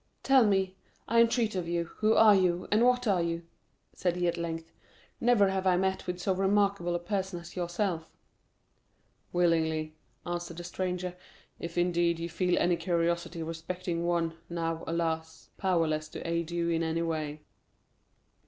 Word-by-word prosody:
"Tell 265 -4 +5
me, 190 -2 +1 0.3
I 230 +1 +5
entreat 230 -1 +2
of 180 -3 -2
you, 170 0 0
who 215 +1 +3
and 200 0 +4
what 250 0 +3
you 210 - +3 0.3
are?" - - -11 0.5
said 175 -2 0
he 180 0 0
at 170 - +1
length. 165 -1 -4 0.5
"Never 230 -5 +4
have 190 0 -1
I 180 -1 +4
met 190 0 -1
with 180 0 -3
so 190 +2 +1
remarkable 195 -2 +1
a - - 0
person 190 0 -2
as 170 0 -12
yourself." 175 -2 -2 1.2
"Willingly," 160 -3 +1 0.3
answered 175 -1 -4
the 175 - -6
stranger; 180 0 -3 0.4
"if, 170 +1 -6
indeed, 175 -1 +2
you 165 +1 -4
feel 180 +1 +1
any 175 -1 +2
curiosity 170 -1 -1
respecting 170 +1 -4
one, 170 -1 0
now, 165 -1 -2
alas, 160 -1 -3
powerless 165 -5 +1
to - - -7
aid 170 0 -1
you 170 0 -1
in 165 -1 +1
any 165 0 0
way." 155 -2 -3
175 Hz, 155 wpm, -30 LUFS, 165-190 Hz, 1.2 s, Tell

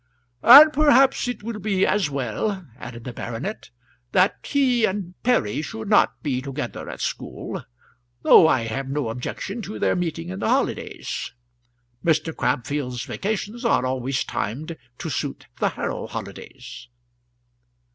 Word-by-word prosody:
"And 295 +5 +10
perhaps 275 -4 +4
it 245 -4 -4
will 225 -1 -5
be 195 -2 +1
as 200 -7 +1
well," 140 - -2
added 120 -1 -8
the 125 - -6
baronet, 120 - -5 0.4
"that 185 +2 +4
he 255 -4 +2
and 190 -3 -1
Perry 150 - +1
should 220 +4 -6
not 210 - +3
be 130 -4 -1
together 140 +2 -5
at - - -7
school, - - -5 0.6
though 160 - +8
I 130 - +3
have 115 +4 -4
no 140 -4 -1
objection 190 - -5
to 215 0 -6
their - - +1
meeting 160 - -3
in 95 +1 -5
the - - -1
holidays. - - -2 0.7
Mr. 160 0 +1
Crabfield's 125 0 -2
vacations 215 +3 -4
are 230 - +2
always 130 +1 -1
timed 150 +10 -4 0.2
to - - -5
suit - - -4
the - - +2
Harrow - - -4
holidays." - - -9
165 Hz, 140 wpm, -23 LUFS, -, 0.7 s, And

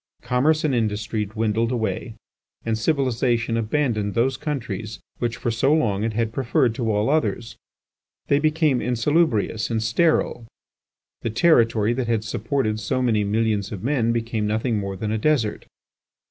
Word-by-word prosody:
Commerce 135 +6 +2
and 150 -3 +1
industry 110 -1 -1
dwindled 110 +2 -1
away, 110 -1 -2 0.5
and 115 -1 0
civilization 120 -2 0
abandoned 115 -3 -1
those 130 +3 +2
countries 115 -7 -4 0.2
which 120 -1 -2
for 120 - -2
so 125 +5 +1
long 110 -10 +1
it 115 0 -1
had 115 0 -1
preferred 125 -2 +1
to 115 -1 -1
all 105 +1 +1
others. 115 -7 0 0.7
They 140 - +2
became 155 -3 +2
insalubrious 120 -3 +1
and 110 -1 -1
sterile; 120 -1 +1 0.7
the - - -2
territory 115 -4 +3
that 125 -1 -2
had 115 -2 0
supported 110 0 -1
so 110 +5 -1
many 110 -4 +2
millions 105 -1 0
of 100 -4 -6
men 120 -3 +1
became 115 -2 -1
nothing 110 +1 0
more 100 -1 -4
than 105 +2 -3
a 110 - -1
desert. 125 -5 0
115 Hz, 150 wpm, -23 LUFS, 110-130 Hz, 0.7 s, territory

